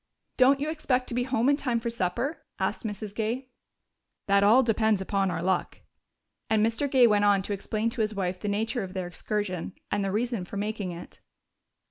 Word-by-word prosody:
"Don't 270 Hz, +2 st, +5 dB
you 300 Hz, +2 st, -1 dB
expect 260 Hz, -5 st, 0 dB
to -, -, -4 dB
be 245 Hz, +1 st, 0 dB
home 250 Hz, -2 st, +1 dB
in 285 Hz, -, +5 dB
time 250 Hz, -5 st, -1 dB
for 235 Hz, +1 st, -3 dB
supper?" 235 Hz, -, -2 dB, 0.2 s
asked -, -, -2 dB
Mrs. 210 Hz, -1 st, -5 dB
Gay. 230 Hz, +4 st, -2 dB, 0.8 s
"That 200 Hz, 0 st, +4 dB
all 230 Hz, +6 st, +6 dB
depends 220 Hz, -3 st, +2 dB
upon 195 Hz, 0 st, 0 dB
our 170 Hz, -2 st, -3 dB
luck." 185 Hz, -1 st, -1 dB, 0.7 s
And 215 Hz, 0 st, +3 dB
Mr. 230 Hz, +5 st, 0 dB
Gay 260 Hz, -2 st, +6 dB
went 210 Hz, -2 st, +4 dB
on 200 Hz, -2 st, +4 dB
to 205 Hz, -, -3 dB
explain 215 Hz, +3 st, -2 dB
to 235 Hz, -, -2 dB
his 215 Hz, 0 st, -1 dB
wife 185 Hz, -2 st, -2 dB
the 210 Hz, -, -4 dB
nature 220 Hz, +4 st, -1 dB
of 190 Hz, -1 st, -7 dB
their 185 Hz, -1 st, -2 dB
excursion 185 Hz, 0 st, -3 dB, 0.2 s
and 205 Hz, -, +1 dB
the 195 Hz, -, -1 dB
reason 230 Hz, -1 st, -1 dB
for 190 Hz, +3 st, -7 dB
making 205 Hz, -2 st, -3 dB
it. 170 Hz, 0 st, -10 dB
215 Hz, 200 wpm, -27 LUFS, 195-240 Hz, 0.8 s, all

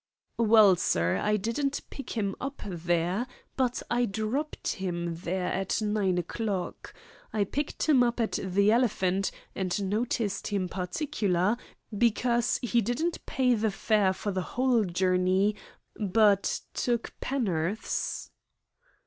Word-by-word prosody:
"Well, 215 Hz, -4 st, +6 dB
sir, 85 Hz, -, +1 dB
I 210 Hz, 0 st, +1 dB
didn't 250 Hz, +7 st, -1 dB
pick 275 Hz, -3 st, -7 dB
him 200 Hz, -3 st, 0 dB
up 275 Hz, +1 st, -5 dB
there, 175 Hz, +4 st, -1 dB, 0.3 s
but 255 Hz, -2 st, 0 dB
I 245 Hz, 0 st, +3 dB
dropped 220 Hz, +8 st, -2 dB
him 175 Hz, -4 st, -2 dB
there 180 Hz, +1 st, -2 dB
at 190 Hz, +3 st, -1 dB
nine 210 Hz, -4 st, +1 dB
o'clock. 190 Hz, +2 st, -3 dB, 0.4 s
I 215 Hz, -2 st, +1 dB
picked 290 Hz, +9 st, -3 dB
him 285 Hz, -5 st, +5 dB
up 240 Hz, 0 st, +1 dB
at 225 Hz, -, 0 dB
the 200 Hz, +2 st, +3 dB
Elephant, 195 Hz, -5 st, +2 dB, 0.2 s
and 190 Hz, +1 st, -1 dB
noticed 210 Hz, -1 st, -1 dB
him 200 Hz, -3 st, -1 dB
particular 190 Hz, -, 0 dB, 0.4 s
because 235 Hz, +2 st, +2 dB
he 240 Hz, -1 st, +2 dB
didn't 280 Hz, -, -1 dB
pay 255 Hz, -2 st, +2 dB
the 220 Hz, -1 st, +1 dB
fare 205 Hz, -1 st, +2 dB
for 205 Hz, +2 st, -3 dB
the 190 Hz, -1 st, -1 dB, 0.2 s
whole 250 Hz, -4 st, +3 dB
journey, 185 Hz, +3 st, +2 dB, 0.4 s
but 205 Hz, -1 st, +2 dB
took 240 Hz, -2 st, -1 dB
penn'orths." 205 Hz, -6 st, -2 dB
210 Hz, 125 wpm, -28 LUFS, 185-240 Hz, 0.4 s, Well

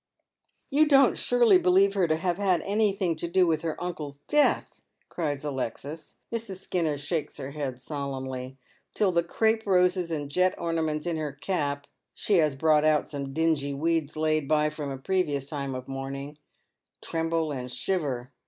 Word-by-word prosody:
" -, -, -45 dB
You 305 Hz, +3 st, +4 dB
don't 275 Hz, -3 st, +5 dB
surely 235 Hz, -6 st, +4 dB
believe 190 Hz, +2 st, +4 dB
her 190 Hz, -4 st, +2 dB
to 155 Hz, -, +2 dB
have 175 Hz, +2 st, -1 dB
had 185 Hz, -4 st, +2 dB
anji; 205 Hz, 0 st, +1 dB
hing 185 Hz, -4 st, +1 dB
to 170 Hz, -, -2 dB
do 185 Hz, +2 st, +3 dB
with 160 Hz, -2 st, +1 dB
her 160 Hz, -2 st, -3 dB
uncle's 155 Hz, -5 st, -5 dB
death? 295 Hz, 0 st, +2 dB
" -, -, -45 dB
cries 145 Hz, -4 st, -3 dB
Alexis. 145 Hz, +2 st, -5 dB, 0.2 s
Mrs. 225 Hz, -5 st, -4 dB
Skinner 165 Hz, -6 st, -1 dB
shakes 150 Hz, +1 st, -3 dB
her 140 Hz, -1 st, -6 dB
head 140 Hz, -4 st, -4 dB
solemnly, 130 Hz, -2 st, -5 dB, 0.4 s
till 200 Hz, -3 st, +3 dB
the 170 Hz, -1 st, +3 dB
crape 220 Hz, +6 st, +1 dB
roses 180 Hz, -2 st, +3 dB
and 145 Hz, -3 st, -3 dB
jet 180 Hz, +4 st, +2 dB
ornaments 160 Hz, -2 st, -1 dB
in 170 Hz, -2 st, -1 dB
her 150 Hz, -2 st, -3 dB
cap 145 Hz, -2 st, -2 dB, 0.2 s
— -, -, -58 dB
she 205 Hz, -, +2 dB
has 155 Hz, -4 st, +3 dB
brought 150 Hz, +1 st, +3 dB
out 155 Hz, -1 st, +3 dB
some 140 Hz, -2 st, -5 dB
dingj' 145 Hz, -3 st, 0 dB
weeds 160 Hz, -1 st, 0 dB
laid 155 Hz, -2 st, +1 dB
by 150 Hz, 0 st, +2 dB
from 150 Hz, -2 st, -5 dB
a 135 Hz, -, -4 dB
previous 145 Hz, -2 st, -1 dB
time 140 Hz, -2 st, -4 dB
of 130 Hz, 0 st, -6 dB
mourning 135 Hz, +2 st, -6 dB, 0.3 s
— -, -, -50 dB
tremble 165 Hz, -1 st, -1 dB
and 125 Hz, -3 st, -5 dB
shiver. 130 Hz, -3 st, -2 dB
155 Hz, 180 wpm, -27 LUFS, 140-180 Hz, 0.4 s, don't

